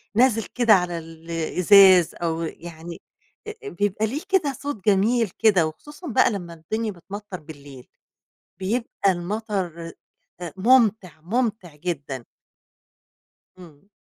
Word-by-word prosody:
نازل 230 -2 +3
كده 235 -3 +3
على 180 -2 +1
ال 165 0 -10
الإزاز 180 +2 +5
أو 165 -1 -2
يعني 170 +1 -8 0.5
آآ، 430 -1 -8
بيبقى 205 - -1
ليه 285 +8 -4
كده 330 -8 +2
صوت 260 -7 -6
جميل 215 +2 +3
كده 195 -8 +4
وخصوصًا 295 - -10
بقى 235 - +3
لمّا 175 -4 -6
الدنيا 215 +7 -3
بتمطّر 195 +1 -9
بالليل، 140 -4 -13 0.7
بيبقى 200 -1 0
المطر 175 -3 -4 0.6
ممتع، 210 - +3
ممتع 210 -3 -2
جدًا. 145 -7 -5 1.3
إمم. 170 +1 -16
190 Hz, 110 wpm, -23 LUFS, 165-225 Hz, 1.3 s, الإزاز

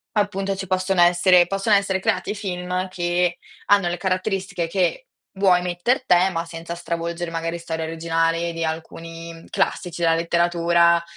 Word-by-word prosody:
appunto 195 -1 0
ci 190 0 -6
possono 185 0 +1
essere 175 0 +5
possono 195 +2 +2
essere 195 -1 +1
creati 205 - -1
film 180 -2 -3
che 175 -1 -1 0.3
hanno 200 -3 +4
le 175 - -3
caratteristiche 190 -1 -2
che 190 - -1 0.3
vuoi 185 -2 +4
metter 180 +9 0
te 180 -3 +4
ma 165 0 -3
senza 165 0 -7
stravolgere 170 0 -4
magari 165 +1 -3
storie 160 -1 -4
originali 165 +1 -1
di 165 0 -3
alcuni 165 +1 -6
classici 175 -1 -2
della 165 -1 +4
letteratura, 170 0 +2
175 Hz, 145 wpm, -22 LUFS, 165-190 Hz, 0.3 s, essere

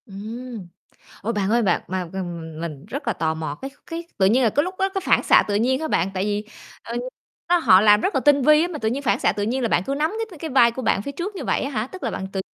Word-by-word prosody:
Ừm. 220 0 -8 0.6
Ủa, 225 +4 -1
bạn 205 -2 -1
ơi 235 +1 +3
bạn, 200 - +2
mà 185 0 -2
m 165 - -12 0.5
mình 155 -2 -6
rất 275 +7 -6
là 230 - +2
tò 160 -4 -1
mò, 155 -2 -4
cái 270 - -5 0.2
cái 335 0 -6
tự 190 - +4
nhiên 240 +7 +4
là 230 - +3
cái 290 - +2
lúc 365 +2 -5
đó 385 - +2
cái 390 0 -3
phản - - +3
xạ - - +5
tự 205 - 0
nhiên 255 +6 +1
hả 315 - -2
bạn? 180 - +1
Tại 185 0 -1
vì, 210 0 -1 0.4
ờ, 235 - -6 0.5
nó 350 0 +4
họ 185 - +6
làm 210 0 +6
rất - - -1
là 270 - +2
tinh 285 0 +4
vi 305 +3 +6
á, 345 - 0
mà 330 -4 -6
tự 220 - -1
nhiên 265 +5 -2
phản 275 - +1
xạ - - +3
tự 205 - -3
nhiên 245 +5 -1
là 235 - +1
bạn 175 - +2
cứ 275 - -2
nắm 300 +3 0 0.2
c - - -21
cái 345 - -12
cái 320 - -5
vai 240 -3 +5
của 260 - -6
bạn 215 -3 +1
phía 280 - -5
trước 380 +7 -5
như - - -5
vậy - - 0
á 275 - -3
hả? 220 -4 -2
Tức 370 +7 -11
là - - -1
bạn 190 - -4
tự 195 - -2
235 Hz, 310 wpm, -22 LUFS, 200-290 Hz, 0.6 s, họ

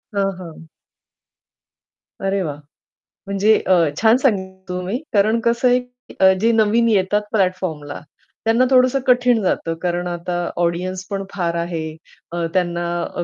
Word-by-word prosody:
हां, 195 -1 +1
हां. 165 -2 -11 1.5
अरे, 195 0 0
वा! 150 -4 -3 0.7
म्हणजे 200 +2 +3
अ, 190 - +5 0.3
छान 225 +2 +5
सांगितलं 190 -7 -1
तुम्ही. 180 +5 -3 0.2
कारण 215 +3 +3
कसं 235 +2 +2
आहे 250 0 +4
की 245 -6 0
जे 225 +3 +3
नवीन 225 +1 +3
येतात 205 0 +2
प्लॅटफॉर्मला 185 -8 -1 0.5
त्यांना 230 +3 +3
थोडंसं 255 +1 +4
कठीण 245 -2 +4
जातं. 170 -3 -1
कारण 175 0 -1
आता 175 0 -4 0.3
ऑडियन्स 180 +2 -2
पण 195 -1 -3
फार 170 -3 -1
आहे. 165 -2 -3 0.4
अ, 170 0 -2
त्यांना 175 -1 -1
190 Hz, 130 wpm, -20 LUFS, 175-225 Hz, 1.5 s, अ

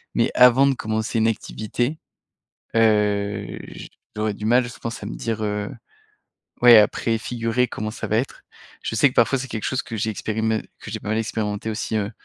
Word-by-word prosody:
mais - - +2
avant 125 +2 +7
de 135 - +2
commencer 110 0 -2
une 110 0 +3
activité, 115 +5 -2 0.8
heu, 105 -2 +2 0.7
j'aurais 105 -1 -1
du 105 +1 -5
mal, 125 +3 +4
je 120 - -11
pense, 115 -1 -5
à - - -5
me - - -5
dire, 110 -2 -3
heu, 105 0 -2 0.9
ouais 120 -1 +9
à 105 - +7
préfigurer 115 +1 -1
comment 110 0 -4
ça 110 - -5
va 110 - +2
être. 130 - -4 0.4
Je - - -3
sais 115 +6 +5
que 125 - -11
parfois 135 +3 +3
c'est 135 +1 -5
quelque 110 -3 -5
chose 130 - 0
que 115 - -6
j'ai 110 +1 -1
expérimenté 110 +1 -1 0.2
que - - -9
j'ai 110 +1 -5
pas 100 - -7
mal 110 - 0
expérimenté 110 -1 -2
aussi, 110 0 -2
heu, 105 -1 -1
110 Hz, 195 wpm, -23 LUFS, 105-120 Hz, 0.9 s, ouais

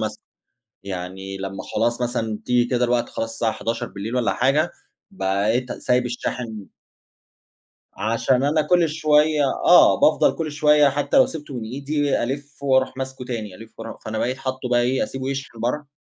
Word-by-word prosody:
ماسكه، 110 -1 -4 0.6
يعني 95 +1 -6
لمّا 95 0 -6
خلاص 120 +1 +1
مثلًا 115 -3 -2
تيجي 125 -1 +3
كده 125 0 +1
الوقت 120 0 0
خلاص 115 - -3
الساعة 115 -1 0
23:00 115 -1 -4
والَّا 125 -2 +1
حاجة 140 +6 +2 0.4
بقيت 110 - 0
سايب 125 0 0
الشاحن 120 -3 -5 1.2
عشان 115 +4 +1
أنا 150 +2 +2
كل 170 +2 +3
شوية 150 -1 +3 0.2
آه، - - +7
بافضل - - +4
كل 160 -2 -3
شوية 150 0 +5
حتى 145 - -1
لو 265 -2 +7
سِبته 150 - -8
من 120 -3 -4
إيدي 140 +4 -1
ألِف 140 +3 -5
وأروح 130 -1 +2
ماسكه 130 -1 -5
تاني، 110 -6 -5
ألِف 115 +4 -14
وأرو 115 0 -7
فأنا 110 0 -5
بقيت 125 +3 -1
حاطّه 130 -1 -4
بقى 120 - +4
إيه، 130 +2 +1
أسيبه 135 0 -5
يشحن 135 -4 -6
برّه 125 +6 -2
125 Hz, 160 wpm, -22 LUFS, 115-140 Hz, 1.2 s, آه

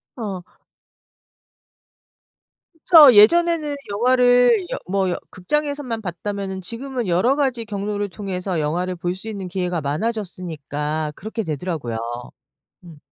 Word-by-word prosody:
어. 205 -7 -5 2.3
그쵸. 315 -4 +8
예전에는 305 +7 +5 0.2
영화를 245 -1 +4
여 - - -2
뭐 195 -1 +1
여 175 - -1
극장에서만 285 +3 -2
봤다면은 190 +1 -5
지금은 245 +4 -5
여러 185 +10 +2
가지 260 -5 -1
경로를 205 0 -3
통해서 185 -2 -4
영화를 175 +5 -1
볼 175 0 -3
수 190 +4 -11
있는 200 -4 -5
기회가 180 -2 -2
많아졌으니까 155 -4 -3
그렇게 220 +3 -5
되더라고요. 155 - -4 0.9
음. 165 -4 -13
200 Hz, 275 characters per minute, -21 LUFS, 175-245 Hz, 2.3 s, 그쵸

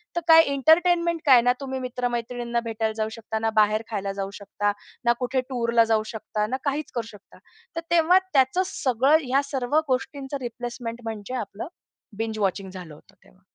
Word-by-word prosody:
तर 345 - 0
काय 325 0 +9
एंटरटेनमेंट 335 +4 +3
काय? 260 -4 +7
ना 245 +1 +3
तुम्ही 265 -1 -4
मित्र-मैत्रिणींना 240 -1 -2
भेटायला 220 -1 -2
जाऊ 220 0 -1
शकता, 220 -1 -5
ना 225 0 0
बाहेर 215 +1 +4
खायला 200 -3 -3
जाऊ 195 0 -4
शकता, 205 0 -2 0.3
ना 235 - +5
कुठे 255 +1 0
टूरला 235 -2 +2
जाऊ 225 -1 +1
शकता, 215 -1 -2
ना 255 +4 -2
काहीच 290 +1 -2
करू 235 -2 -2
शकता. 205 -3 -15 0.4
तर 330 - -2
तेव्हा 340 +2 +5
त्याचं 270 +6 +3
सगळं 270 0 +2
ह्या 265 +2 +2
सर्व 270 -2 -4
गोष्टींचं 270 +2 -2
रिप्लेसमेंट 240 -1 -5
म्हणजे 220 0 -6
आपलं 215 -1 -5 0.5
बिंज 220 -1 -3
वॉचिंग 195 -1 -1
झालं 180 -5 -9
होतं 150 - -19
तेव्हा. - - -24
240 Hz, 175 wpm, -25 LUFS, 220-270 Hz, 0.5 s, काय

